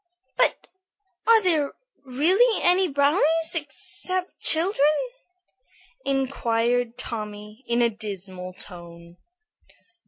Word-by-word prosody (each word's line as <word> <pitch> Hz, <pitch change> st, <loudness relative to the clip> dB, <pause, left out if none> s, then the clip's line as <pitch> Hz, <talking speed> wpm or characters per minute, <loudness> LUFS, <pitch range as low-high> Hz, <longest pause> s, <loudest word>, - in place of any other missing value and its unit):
"But -, -, +1 dB, 0.6 s
are 450 Hz, -1 st, +6 dB
there 315 Hz, -6 st, +1 dB, 0.3 s
really 355 Hz, -, +2 dB
any 365 Hz, +2 st, +4 dB
brownies 310 Hz, +3 st, +2 dB
except 360 Hz, +4 st, -3 dB
children?" 330 Hz, +1 st, +1 dB, 1.2 s
inquired 245 Hz, -3 st, 0 dB
Tommy, 210 Hz, -1 st, -7 dB
in 235 Hz, 0 st, +2 dB
a 235 Hz, -, +4 dB
dismal 190 Hz, -4 st, -7 dB
tone. 170 Hz, -2 st, -8 dB
260 Hz, 85 wpm, -24 LUFS, 210-330 Hz, 1.2 s, are